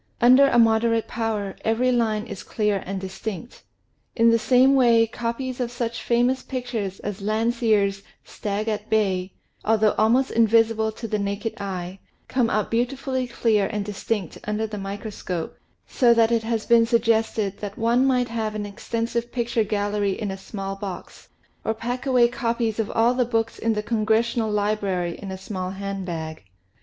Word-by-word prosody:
Under 255 +3 +7
a 240 - +2
moder 230 0 +4
ate 225 - -1
power 215 -4 -2
every 230 +3 +2
line 220 -3 +1
is - - -7
clear 210 -3 -1
and 195 0 -3
distinct. 190 +4 -7 0.5
In 230 0 +5
the 230 - +3
same 255 +3 +5
way 235 -4 +5
copies 240 +3 -4
of 245 -2 -1
such 235 -1 -4
famous 245 +2 +2
pictures 240 -7 -4
as 205 -1 -5
Landseer's 215 -2 +1 0.2
" - - -45
Stag 210 +1 -2
at 215 -1 -3
Bay," 190 -4 +1 0.3
although 215 -1 +3
almost 240 +5 +3
invisible 225 -1 +3
to 230 - -6
the 215 -1 -1
naked 200 +2 -2
eye, 185 -1 -5 0.3
come 250 -3 +1
out 215 -1 -1
beautifully 255 +2 -1
clear 220 -4 +1
and 210 -2 -3
distinct 205 -2 -3
under 210 +1 -1
the 210 -1 -6
microscope, 195 -3 -5 0.3
so 240 -2 +3
that 230 0 +4
it 230 -1 +2
has 225 -1 -2
been 230 -1 +5
suggested 225 -3 +1
that 205 -1 -6
one 235 +3 +3
might 250 -2 +2
have 220 -2 -2
an 210 - -3
exten 225 +3 -3
sive 235 0 -3
picture 235 -2 0
gallery 205 -1 -1
in 210 -3 -2
a - - -4
small 195 0 -6
box, 195 -2 -8 0.3
or 220 - -1
pack 245 +4 -4
away 250 -2 +5
copies 235 -2 -1
of 220 - -1
all 230 +2 +3
the 250 0 +2
books 230 -1 -1
in 225 0 +1
the 210 -1 -2
Congressional 225 +1 +1
Library 205 -4 -1
in 200 - -7
a 190 - -5
small 185 -1 -5
hand 195 0 -5
bag. 160 -2 -5
220 Hz, 175 wpm, -24 LUFS, 205-235 Hz, 0.5 s, Under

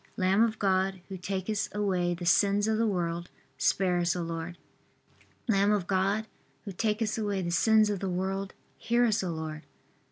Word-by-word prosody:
Lamb 190 +2 +3
of 225 -1 +2
God, 190 -1 +1
who 195 - -5
takest 195 +3 -3
away 185 -4 0
the 175 +1 -7
sins 200 +3 +3
of 220 0 +1
the 230 - +2
world, 175 -3 -2 0.3
Spare 180 -2 +2
us, 175 +1 +1
O 175 - -2
Lord. 165 +1 -5 0.9
Lamb 200 -2 +3
of 205 -4 +1
God, 195 +3 +1 0.4
who 200 - -5
takest 215 +3 -1
away 205 -3 -1
the 170 - -2
sins 215 +4 +4
of 200 - -2
the 195 - -2
world, 190 +2 -3 0.2
Hear 240 +1 +2
us, 220 -3 +1
O 185 - -2
Lord. 160 -1 -5
195 Hz, 180 wpm, -29 LUFS, 175-210 Hz, 0.9 s, sins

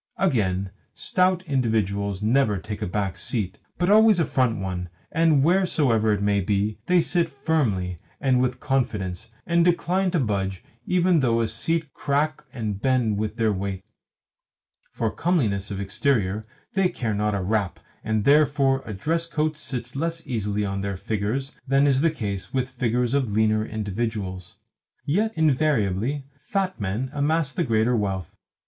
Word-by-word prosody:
Again, 100 - +1 0.2
stout 185 0 +1
individuals 105 - 0
never 110 -2 +3
take 105 +3 -6
a - - -1
back 95 0 -2
seat, 105 -7 -2 0.2
but 180 +2 +2
always 215 -2 +6
a 165 - +3
front 125 -5 +1
one, 90 -2 -4 0.2
and, 160 -4 +3
wheresoever 145 - +3
it 100 -1 +1
be, 105 +1 0
they 180 -1 +5
sit 170 0 +1
firmly, 120 - -1 0.2
and 130 -2 +2
with 125 -1 0
confidence, 105 -10 -2 0.2
and 170 0 +3
decline 180 +2 +2
to 175 -2 +1
budge 95 -6 -1 0.2
even 180 -1 +3
though 115 -4 +2
the 115 - +1
seat 155 +7 -2
crack 150 +2 -1
and 110 -6 -4
bend 120 -5 +1
with 110 0 -2
their 110 -3 +2
weight. 95 0 -4 1.1
For 115 -2 -1
comeliness 110 - 0
of 100 -2 -4
exterior 105 0 0 0.3
they 195 -2 +3
care 120 -10 -2
not 105 0 0
a 100 - -1
rap, 100 -1 -1 0.2
and 110 -1 0
therefore 140 -1 +4
a 110 - -4
dress 165 - -1
coat 155 -1 -1
sits 125 -4 -6
less 165 +3 -2
easily 105 -4 -1
on 100 0 -2
their 100 -1 -3
figures 110 +7 -2 0.2
than 135 +1 +4
is 135 -1 +3
the 165 - +4
case 100 -11 -4
with 130 -1 -1
figures 120 0 0
of 135 -6 +1
leaner 110 0 +2
individuals. 105 -4 -4 0.5
Yet 210 +9 +1
invariably 135 - +1
fat 190 - -2
men 105 +7 -2
amass 150 0 +1
the 175 - 0
greater 115 -1 +2
wealth. 95 -5 -2
120 Hz, 155 wpm, -24 LUFS, 100-150 Hz, 1.1 s, always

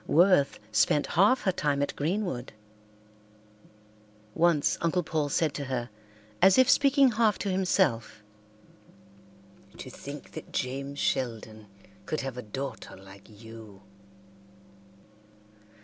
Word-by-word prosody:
Worth 175 -4 +3
spent 110 +7 +2
half 205 +9 +4
her 190 - +1
time 145 -5 -1
at - - -4
Greenwood. 160 - -3 1.8
Once 165 -3 +2
Uncle 170 +2 0
Paul 155 -2 -2
said 155 +1 0
to 140 - -5
her, 125 -3 -4 0.5
as 190 +1 +6
if 260 -1 +6
speaking 275 -1 +4
half 215 -2 +2
to 200 - -3
himself, 150 - 0 1.5
"To - - -9
think - - -10
that - - -10
James 135 +2 -4
Sheldon 110 -6 -3 0.4
could 155 - -2
have 135 -2 -5
a 125 - -6
daughter 125 +1 -7
like 95 +2 -15
you!" 110 -3 -12
145 Hz, 115 wpm, -28 LUFS, 120-185 Hz, 1.8 s, as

